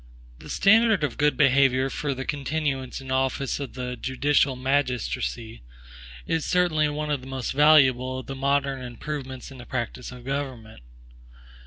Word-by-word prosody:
The - - -12
standard 220 -3 +4
of 140 -5 -1
good 150 0 +2
behavior 135 -2 +4
for 145 -2 -2
the 130 0 -5
continuance 140 -2 -2
in 130 -1 -8
office 135 +1 0
of 140 -4 -6
the 125 -1 -4
judicial 135 +2 +1
magistracy, 125 - -2 0.6
is 160 -2 -1
certainly 165 -4 +2
one 150 0 -3
of 145 -3 -1
the 130 - -11
most 135 -2 -4
valuable 130 -3 +4
of 130 - -7
the 135 - -6
modern 140 0 0
improvements 130 +1 -6
in 135 - -11
the 120 - -10
practice 125 0 -4
of 125 -1 -11
government. 130 - -5
135 Hz, 155 wpm, -25 LUFS, 130-145 Hz, 0.6 s, standard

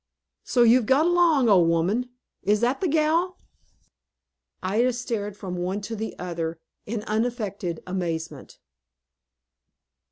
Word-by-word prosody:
"So 245 - +3
you've 235 -1 +5
got 275 +4 +4
along, 340 -7 +4
old 180 -6 +5
woman! 190 +10 +1 0.3
Is 205 +3 +1
that 245 +3 +1
the 375 - +1
gal?" 325 +4 +1 1.3
Ida 225 +7 +2
stared 225 -4 -4
from 185 -4 -5
one 185 +3 -2
to 225 +3 -5
the 220 +1 -5
other, 170 -2 -4 0.3
in 215 0 -3
unaffected 215 -6 -2
amazement. 165 -6 -4
215 Hz, 120 wpm, -25 LUFS, 180-250 Hz, 1.3 s, you've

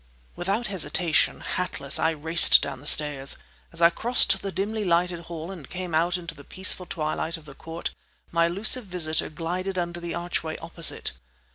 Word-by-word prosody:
Without 200 +6 -2
hesitation, 180 -4 +1
hatless, 145 -6 -1
I 160 - +2
raced 160 +1 +6
down - - -5
the 145 - -7
stairs. 145 -3 +1 0.3
As 165 0 -2
I 170 - +7
crossed 240 +7 +2
the 195 - -5
dimly 210 +3 -3
lighted 175 -1 +1
hall 165 +1 -7
and 165 -8 -11
came 180 -2 -6
out 170 +3 +1
into 175 -1 -8
the 145 -2 -14
peaceful 185 +2 +2
twilight 160 +1 -3
of 160 - -16
the 140 - -11
court, 165 +4 -6 0.4
my 170 0 +2
elusive 210 +7 +3
visitor 170 -4 0
glided 180 +5 -4
under 175 -1 -3
the 170 -1 -5
archway 170 -2 -3
opposite. 165 0 +3
170 Hz, 170 wpm, -25 LUFS, 160-185 Hz, 0.4 s, I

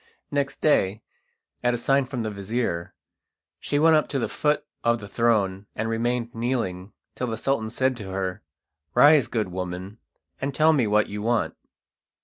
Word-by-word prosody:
Next 140 -1 -1
day, 110 -8 +2 0.6
at 120 0 +2
a - - -2
sign 135 +3 +2
from 125 -3 -4
the 110 - -2
vizir, 100 -3 -3 0.6
she 145 - -1
went 160 +2 +6
up 155 - +2
to 140 - -2
the 120 - 0
foot 150 0 0 0.2
of 120 0 +2
the 100 - -8
throne, 100 -3 +1
and 110 - -2
remained 120 +1 -1
kneeling 115 -6 -2 0.2
till 125 - -3
the 110 -1 -3
Sultan 110 -2 0
said 130 +3 +1
to 100 -4 -7
her: 95 +1 -3 0.5
"Rise, 145 -4 +7
good 110 -5 -1
woman, 90 +3 -5 0.4
and 135 0 -2
tell 160 +1 +5
me 130 -7 +2
what 105 0 +3
you 105 0 -5
want." 115 +1 0
115 Hz, 170 wpm, -25 LUFS, 100-130 Hz, 0.6 s, Rise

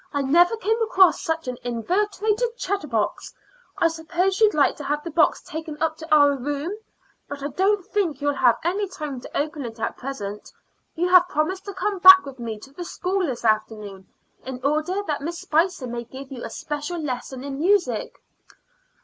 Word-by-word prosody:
"I 285 -1 -1
never 345 +10 +4
came 450 +1 0
across 385 -5 +4
such 320 -3 -2
an 250 -1 -4
inveterate 405 - -1 0.2
chatterbox. 300 - -2 0.4
I 335 - +4
suppose 345 +5 -1
you'd 425 -4 +5
like 295 - +3
to 295 - -7
have 295 +2 -2
the 335 - -6
box 315 0 +2
taken 315 -1 -7
up 320 -1 0
to 320 0 -10
our 290 -2 +6
room; 290 +8 -3 0.5
but 285 -1 -7
I 285 - -2
don't 385 +5 +1
think 355 -9 -1
you'll 290 0 0
have 245 -4 +3
any 390 +5 0
time 300 -8 -6
to - - -7
open 300 0 -2
it 230 -1 -8
at 225 - -3
present. 210 -6 -6 0.4
You 345 +2 0
have 360 -1 +7
promised 370 +3 -2
to 400 -2 -7
come 400 0 -2
back 375 0 +9
with 270 -2 -9
me 230 -2 -4
to 270 - -14
the 350 - -6
school 370 +2 -2
this 240 -3 -5
afternoon, 215 -3 -1 0.4
in 260 -1 -6
order 310 +7 0
that 300 -8 -3
Miss 335 +4 -4
Spicer 330 -1 +1
may 240 -1 -5
give 265 +3 -11
you 250 -3 -7
a - - -5
special 295 +4 -5
lesson 260 -3 -5
in 275 -1 -5
music." 340 - +1
305 Hz, 190 wpm, -23 LUFS, 265-365 Hz, 0.5 s, back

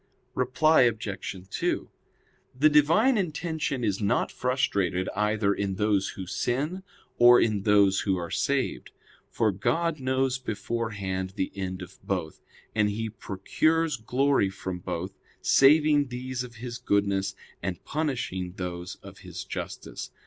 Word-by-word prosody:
Reply 145 +5 +3
Obj. 105 -3 -5
2: 95 - -2 0.7
The 150 +4 +6
Divine 185 - +4
intention 160 -6 -2
is 100 -1 0
not 100 - +1
frustrated 100 -8 0
either 105 0 +1
in 100 -1 -2
those 105 -1 +1
who 95 - -5
sin, 135 - -2 0.4
or 120 0 +8
in 105 -3 +1
those 100 -1 +4
who 95 -2 0
are 85 -1 -5
saved; 140 -1 -1 0.4
for 110 -2 +1
God 165 - 0
knows 130 0 0
beforehand 100 -5 -3
the 95 - -2
end 95 -1 -4
of 90 +1 -13
both; 90 -5 -3 0.3
and 105 -1 +2
He 110 +2 -3
procures 155 +11 0
glory 125 -1 +2
from 95 -1 -5
both, 90 +2 -5 0.2
saving 145 +1 +5
these 125 0 -4
of 125 -1 -10
His 120 +1 -6
goodness, 100 -1 0 0.3
and 90 -3 -4
punishing 120 - -2
those 90 -2 -5
of - - -12
His - - -7
justice. - - -6
110 Hz, 135 wpm, -27 LUFS, 95-135 Hz, 0.7 s, or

